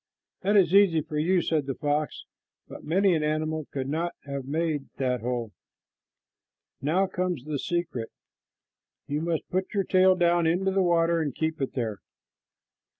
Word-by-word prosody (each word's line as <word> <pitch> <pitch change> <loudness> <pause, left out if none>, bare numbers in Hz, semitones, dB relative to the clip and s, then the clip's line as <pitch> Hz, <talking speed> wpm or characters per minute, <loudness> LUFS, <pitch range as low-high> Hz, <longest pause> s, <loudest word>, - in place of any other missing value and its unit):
"That 205 +2 +3
is 180 -3 +4
easy 195 -5 +5
for 150 0 -4
you," 175 +3 +2
said 155 -4 0
the 135 - -2
fox, 150 +1 -2 0.4
"but - - -10
many 190 +4 +3
an 160 - +1
animal 155 0 -1
could 135 -1 -3
not 165 +4 -2
have 140 -2 -5
made 155 0 -2
that 125 -3 0
hole. 120 -2 -3 1.3
Now 165 +8 +2
comes 180 -6 -2
the 150 -2 -3
secret. 170 -10 -2 1.0
You 145 +2 -2
must 165 -1 -2
put 185 +3 -2
your 200 - +2
tail 185 0 +4
down 175 -2 +3
into 185 +4 +1
the 195 0 +2
water 170 -1 +2
and 145 -5 -3
keep 160 -2 -2
it 135 - -2
there. 110 -6 -3
160 Hz, 160 wpm, -27 LUFS, 145-180 Hz, 1.3 s, easy